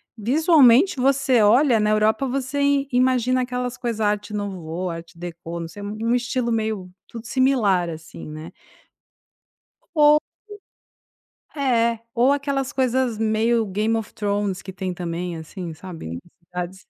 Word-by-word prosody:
visualmente, 275 - +4
você 270 -2 +3
olha 235 +3 +5
na 210 0 +2
Europa, 215 +5 +2
você 275 +2 -2
i 280 -1 +2
imagina 255 0 +2
aquelas 250 0 -3
coisas: 235 -3 -3
Arte 210 0 -1
Nouveau, 180 -3 -4
Arte 165 +1 -9
Deco, 170 0 -7
não 165 - -5
sei, 205 +5 -11
no 220 +4 -1
estilo 245 -1 -1
meio 215 -5 -2 0.2
tudo 230 0 -9
similar, 220 -10 +2
assim, 160 -1 -9
né? 155 +2 -8 1.4
Ou 300 0 +6 1.4
É, 235 -5 +1 0.2
ou 250 +4 +4
aquelas 280 -2 -1
coisas 255 -3 0
meio 225 +1 +2
Game 210 +4 0
of 225 0 -4
Thrones 205 -2 -2
que 190 - -8
tem 185 -1 -4
também, 175 0 -4
assim, 165 +1 -7
sabe. 155 - -8 0.3
Cidades, 180 +1 -6
220 Hz, 135 wpm, -22 LUFS, 185-255 Hz, 1.4 s, Ou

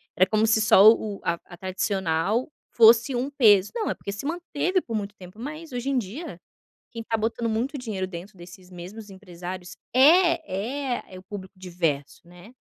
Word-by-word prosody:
Era 185 - +5
como 215 0 +2
se 220 0 +3
só 215 -1 +8
o 210 -3 -5
a 170 - +1
a 175 - -13
tradicional 190 - -1 0.2
fosse 235 +3 +5
um 255 +3 -1
peso. 210 -8 +4
Não, 450 -2 -1
é - - 0
porque 200 - -7
se 205 +7 -7
manteve 350 +3 -1
por 230 - -6
muito 205 -1 -3
tempo, 185 +2 -14
mas 305 +4 -7
hoje 245 +2 -3
em 275 - +1
dia, 250 - -5 0.5
quem 230 - -7
está 225 0 -1
botando 230 +1 -2
muito 245 +7 -2
dinheiro 205 -6 -4
dentro 190 +3 -9
desses 180 +1 -13
mesmos 195 +4 -10
empresários 180 -1 -9 0.2
é 280 - +3
é - - -15
é 185 - -8
o - - -13
público 190 0 -9
diverso, 170 -5 -3
né. 180 +6 -15
215 Hz, 185 wpm, -25 LUFS, 185-250 Hz, 0.5 s, só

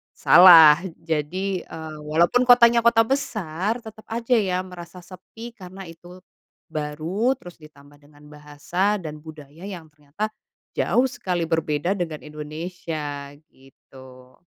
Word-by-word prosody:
salah. 165 -4 +8 0.2
Jadi, 175 +4 -3
eee, 160 -1 -9
walaupun 170 +11 +1
kotanya 240 -1 +6
kota 230 -1 +4
besar 220 - -3
tetep 220 -1 -13
aja 235 +2 -1
ya 185 -3 -1
merasa 180 -1 -12
sepi 195 +6 -12
karena 190 -3 -11
itu 175 +1 -14 0.5
baru, 160 - -2
terus 175 -11 -14
ditambah 145 -2 -18
dengan 145 0 -21
bahasa 150 +7 -2
dan 155 -1 -7
budaya 155 +2 -12
yang 170 -6 -9
ternyata 150 +9 -6 0.4
jauh 255 +2 +2
sekali 180 -10 -3
berbeda 165 +2 -1
dengan 165 -5 -4
Indonesia, 150 -1 -7 0.2
gitu. 130 -1 -18
170 Hz, 120 wpm, -23 LUFS, 150-200 Hz, 0.5 s, salah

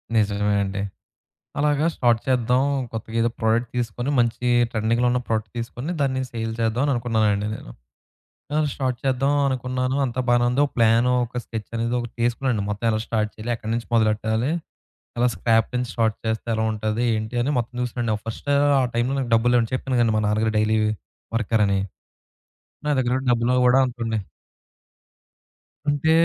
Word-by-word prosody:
నిజమే 105 -1 +2
అండి. 100 0 -3 0.8
అలాగా 145 +1 +2
స్టార్ట్ 120 -2 +2
చేద్దాం, 125 0 +2 0.3
కొత్తగేదో 115 +1 -1
ప్రొడక్ట్ 115 +1 +1
తీసుకొని, 120 +3 -2
మంచి 120 +1 +1 0.2
ట్రెండింగ్‌లో 115 +2 +1
ఉన్న 125 - +1
ప్రొడక్ట్ 110 -2 -1
తీసుకొని, 120 +7 -4
దాన్ని 130 -2 +1
సేల్ 115 -1 -3
చేద్దాం 115 +3 +1
అని 145 - +2
అనుకున్నానండి 110 -4 +1
నేను. - - -10 0.8
ఆ! - - +2 0.2
స్టార్ట్ 130 -3 -2
చేద్దాం 135 +1 +2 0.2
అనుకున్నాను, 130 0 -1
అంతా 130 0 -2
బానే 120 0 +4
ఉందో 130 +4 +2
ఒక - - -12
ప్లాను 115 +2 +4
ఒక 125 +1 -6
స్కెచ్ 110 -2 -6
అనేది 115 +1 -1
ఒకటి 120 -1 -7
తీసుకున్నాండి 120 -2 0
మొత్తం 105 +3 -2
ఎలా 110 0 0
స్టార్ట్ 105 -2 0
చేయాలి, 110 +2 -6
ఎక్కడి 110 -1 -5
నుంచి 115 0 -3
మొదలెట్టాలి, 110 +3 +1 0.7
ఎలా 125 +1 +3
స్క్రాప్ 115 -1 +2
నుంచి 125 0 -1
స్టార్ట్ 110 -2 +1
చేస్తే 110 +1 -2
ఎలా 110 - 0
ఉంటది, 110 +2 -1
ఏంటి 110 +2 -4
అని 140 - 0
మొత్తం 120 +1 -5
చూసానండి. 120 -2 -1
ఫస్టు, 145 +5 -2 0.3
ఆ - - +2
టైంలో 120 +3 +1
నాకు 125 -3 -3
డబ్బులు 120 +2 +3
లేవండి. 115 -1 +2
చెప్పాను 130 0 -2
కదండి 115 -2 +3
మా - - +1
నాన్నగారు 110 +1 +1
డైలీ 110 +1 +2 0.6
వర్కర్ 110 -1 +2
అని, 100 0 +1 1.1
నా - - +1
దగ్గర 125 0 +1
డబ్బులు 120 +1 +2
కూడా 130 +2 +5
అంతుండే 115 -3 -3 1.7
అంటే, 145 +2 +2
115 Hz, 160 wpm, -23 LUFS, 110-125 Hz, 1.7 s, కూడా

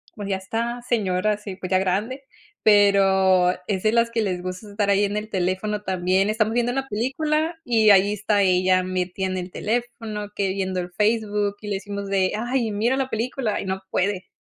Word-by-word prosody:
pues 205 -2 -6
ya 190 - 0
está 230 +5 -3
señora, 210 -4 0
sí, 205 -2 -8
pues, 185 -1 -7
ya 185 - +3
grande, 210 +9 -1 0.4
pero 195 -3 +5 0.2
es 190 -3 -1
de 215 - +3
las 230 0 +2
que 230 -1 0
les 185 -4 -2
gusta 185 +3 -6
estar 200 0 -1
ahí 200 +1 +3
en 205 +1 -1
el 215 +1 -4
teléfono 190 +3 -1
también. 190 +1 +1
Estamos 220 0 +1
viendo 240 0 +1
una 270 +1 -2
película 305 +9 -1
y 220 -3 +4
ahí 200 +1 +5
está 205 0 +1
ella 185 0 +3
metida 185 +1 -2
en 185 0 -3
el 180 0 -5
teléfono, 225 -2 -3
que 195 -2 0
viendo 190 -1 -2
el 180 0 -5
Facebook 210 -1 0
y 210 - -8
le 200 - -1
decimos 200 0 -5
de: 195 -1 +1
"Ay 240 -1 -1
mira 230 +6 +1
la 265 -1 -1
película" 230 0 -2
y - - -6
no 190 0 -3
puede. 190 0 -1
205 Hz, 200 wpm, -23 LUFS, 190-225 Hz, 0.4 s, pero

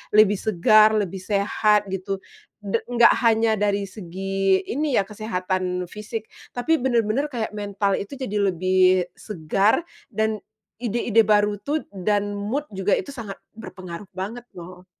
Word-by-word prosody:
lebih 210 -2 +5
segar, 215 +2 +5
lebih 195 -3 -1
sehat, 205 +2 +2
gitu. 190 +1 -3 0.5
Da 200 +3 0
nggak 235 -1 +6
hanya 225 -1 +3
dari 205 -1 0
segi 195 0 -1
ini 290 0 -1
ya, 195 - +2
kesehatan 185 -3 -3
fisik, 210 +4 -6 0.2
tapi 315 +5 0
bener-bener 245 +2 +1
kayak 230 -6 -4
mental 200 -1 -1
itu 205 +8 -4
jadi 210 -6 -2
lebih 185 0 +3
segar 200 - 0 0.2
dan 220 -1 -1 0.4
ide-ide 230 -1 +2
baru 210 -1 +2
tuh 295 +5 -2
dan 205 +2 0
mood 215 +9 -3
juga 195 +1 +1
itu 280 - -6
sangat 220 -6 -7 0.2
berpengaruh 185 -3 -9
banget, 225 +6 -5
loh. 180 +1 -11
205 Hz, 135 wpm, -23 LUFS, 190-225 Hz, 0.5 s, nggak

